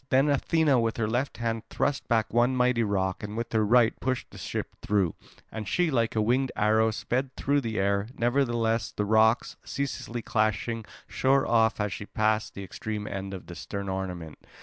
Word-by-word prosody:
Then 135 +3 +4
Athena 145 -1 +3
with 115 -1 0
her 110 -2 0
left 125 +5 -1
hand 115 -1 -1
thrust 145 -1 -1
back 110 -3 +1
one 120 +2 +3
mighty 125 -1 +3
rock 95 -3 0
and 105 +1 -6
with 115 0 -4
her 110 -1 +3
right 115 +1 +4
pushed 130 0 -2
the - - -11
ship - - -4
through; 100 -6 +1 0.4
and 110 -2 -5
she, 175 - +1
like 115 -4 +1
a 110 - +2
winged 125 +4 +1
arrow, 110 +1 +3
sped 130 +4 -2
through 140 +1 +1
the 110 -3 -3
air. 100 +1 +1
Nevertheless 120 -2 +1
the 105 - -2
rocks, 110 +2 +3
ceaselessly 120 -4 -4
clashing, 110 +1 0 0.2
shore 135 +1 +2
off 115 -1 +3
as 105 -2 -1
she 100 - -7
passed 110 0 0
the 100 - -6
extreme 105 +3 -5
end 95 -1 -5
of 95 -2 -7
the 90 - -9
stern 100 +2 -5
ornament. 90 -5 -5
115 Hz, 190 wpm, -27 LUFS, 105-125 Hz, 0.4 s, Then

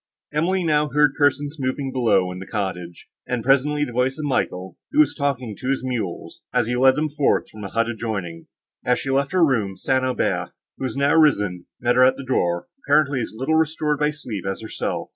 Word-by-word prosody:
Emily 180 +5 +1
now 150 -2 +2
heard 145 +1 +3
persons 145 0 +1
moving 135 +1 -2
below 110 -8 +2
in 90 - -7
the 95 - -9
cottage, 90 -5 -4 0.2
and 125 -2 -2
presently 140 +3 +3
the 125 - -4
voice 125 +2 0
of 155 - -4
Michael, 95 -9 -2
who 305 - 0
was 305 - +5
talking 130 -7 -2
to 130 - -3
his 135 -1 0
mules, 115 -9 -4
as - - +2
he 120 +2 -1
led 130 +1 +5
them 155 +2 0
forth 145 -1 +1
from 110 -1 -10
a 100 - -5
hut 115 +2 0
adjoining. 100 -8 -4 0.4
As 125 0 +2
she 135 - -3
left 135 +1 +1
her 180 -2 +4
room, 105 -9 0
St. 130 -1 +1
Aubert, 130 -1 -1 0.3
who - - -2
was 130 0 -4
now 140 +1 +3
risen, 105 - +2
met 120 +1 +1
her 130 - +7
at 130 - +4
the 140 - -7
door, 85 -9 0 0.2
apparently 145 -4 +3
as 110 - -5
little 135 +6 -1
restored 155 -2 +1
by 150 0 +2
sleep 120 - -6
as 95 +2 -4
herself. 110 - -4
130 Hz, 215 wpm, -22 LUFS, 110-145 Hz, 0.4 s, her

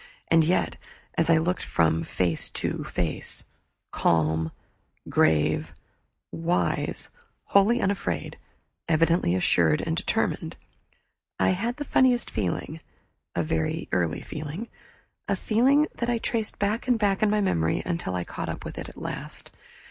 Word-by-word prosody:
And 165 -1 +6
yet, 175 +4 +1 0.4
as 165 - +2
I 165 - +6
looked 175 +3 0
from 80 -1 +2
face 85 0 0
to - - -3
face, 85 -3 -3 0.5
calm, 80 0 +1 0.6
grave, 75 -1 +2 0.6
wise, 165 +2 -1 0.3
wholly 205 +5 +4
unafraid, 200 -2 -2 0.5
evidently 165 - +3
assured 85 -4 +3
and - - -1
determined, - - -1 0.8
I - - +4
had 225 +7 -1
the 290 - -4
funniest 250 -3 +3
feeling 110 - -2 0.6
a 85 - +1
very 80 0 -1
early 85 -3 0
feeling 155 +9 -6 0.6
a - - +1
feeling 265 +7 +3
that 235 - -2
I 240 - +2
traced 225 -1 -2
back 210 +4 -1
and 250 -2 +4
back 200 -3 +1
in 215 - +4
memory 190 - +1
until 170 - -2
I 90 - -1
caught - - -5
up - - -5
with - - -6
it - - -6
at - - -15
last. - - -6
165 Hz, 135 wpm, -26 LUFS, -, 0.8 s, And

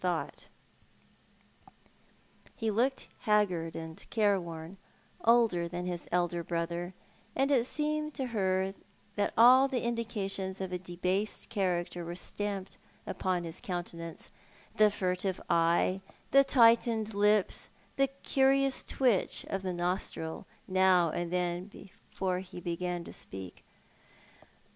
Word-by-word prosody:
Home 180 -3 +1
Questions. - - -14 2.1
263 225 - -3
He 220 - +2
looked 255 +5 0 0.2
liacrgard 185 -6 +2
and 160 0 -8
careworn, 185 -5 0 0.5
older 225 -7 +4
than 175 +1 -4
Lis 175 -1 -4
elder 175 -1 0
brother, 170 +2 -3 0.4
and 275 +1 +2
it 250 -3 +3
seemed 305 0 -1
to 265 - -1
her 190 -2 +1 0.4
that 205 -1 +1
all 255 +4 +8
the 260 -3 -2
indications 205 -5 -2
of 190 -1 -4
a 180 - -2
debased 185 +3 -2
character 180 -5 -1
were 170 +1 -5
staraiied 200 +1 -5 0.3
upon 185 -2 -1
his 165 0 -6
countenance 170 -2 -6 0.2
— - - -27
the 215 0 +6
furtive 185 -1 -1
eye, 170 +3 +2 0.3
the 275 0 +7
tightened 230 -4 +4
lips, 205 0 +2 0.3
the 275 0 +4 0.2
curious 270 0 +3
twitch 245 -8 +1
of 195 - -1
the 185 -1 -2
nostril 175 -2 -3 0.2
ziow 185 -3 +4
and 175 -1 -2
then 180 0 -1
before 190 -2 -5
he 185 -1 -9
began 175 0 -3
to - - -10
speak. 95 -2 -6
190 Hz, 125 wpm, -31 LUFS, 175-220 Hz, 2.1 s, all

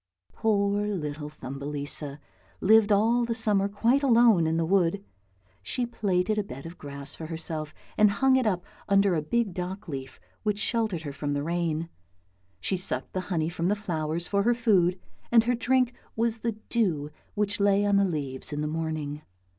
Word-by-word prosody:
Poor 205 -2 +1
little 150 -6 -3
Thumbelisa 145 0 -3 0.4
lived 220 +1 +5
all 225 +4 +4
the 230 -1 -1
summer 210 -3 +2
quite 230 +7 +2
alone 230 - +5
in 160 +1 +1
the 165 - +1
wood. 195 +2 +1 0.6
She 245 - -2
plaited 210 -2 0
a - - 0
bed 135 -6 -9
of 165 +2 -9
grass 140 -1 -6
for 160 - -6
herself 160 -2 -3 0.3
and 210 -1 +7
hung 260 +6 +3
it 255 -3 +2
up 180 -4 0 0.2
under 200 -1 +4
a 160 - +1
big 215 +5 0
dock 185 +2 -5
leaf 135 - -6 0.2
which 210 -1 0
sheltered 215 -6 -1
her 145 -2 -5
from 145 0 -3
the 145 0 -1
rain; 165 0 -1 0.7
she 190 - -1
sucked 180 - -3
the 185 - -1
honey 160 -4 0
from 170 0 -2
the 205 - +2
flowers 170 -4 -3
for 200 -1 +1
her 240 +4 +3
food, 190 -6 +3 0.3
and 230 -1 +6
her 245 +2 +1
drink 250 +1 +2 0.2
was 230 0 0
the 230 0 -1 0.2
dew 165 -11 0 0.2
which 205 -1 0
lay 200 0 +3
on 205 -1 +3
the 200 - +4
leaves 145 -6 -3
in 145 0 -2
the 150 - -1
morning. 155 -2 -3
190 Hz, 180 wpm, -27 LUFS, 155-215 Hz, 0.7 s, and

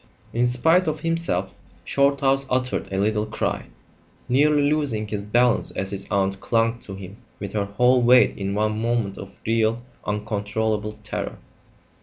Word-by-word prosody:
In 120 +1 +2
spite 160 +9 +3
of 155 -1 -2
himself, 165 - -1 0.3
Shorthouse 140 -1 +2
uttered 125 -4 -1
a 95 - -2
little 105 +2 +1
cry, 105 - -2 0.6
nearly 145 +3 +3
losing 140 -8 0
his 105 0 -3
balance 120 +4 +2
as 95 0 -2
his 100 -1 -5
aunt 95 0 0
clung 115 +2 +1
to 100 -4 -8
him 95 +1 -10 0.2
with 100 -1 -6
her 105 -2 0
whole 125 +5 +3
weight 125 +1 +5
in 100 0 -3
one 110 +1 0
moment 115 -4 -1
of 100 0 -8
real, 115 +1 +1 0.2
uncontrollable 105 0 -2
terror. 105 - -4
110 Hz, 150 wpm, -23 LUFS, 100-125 Hz, 0.6 s, weight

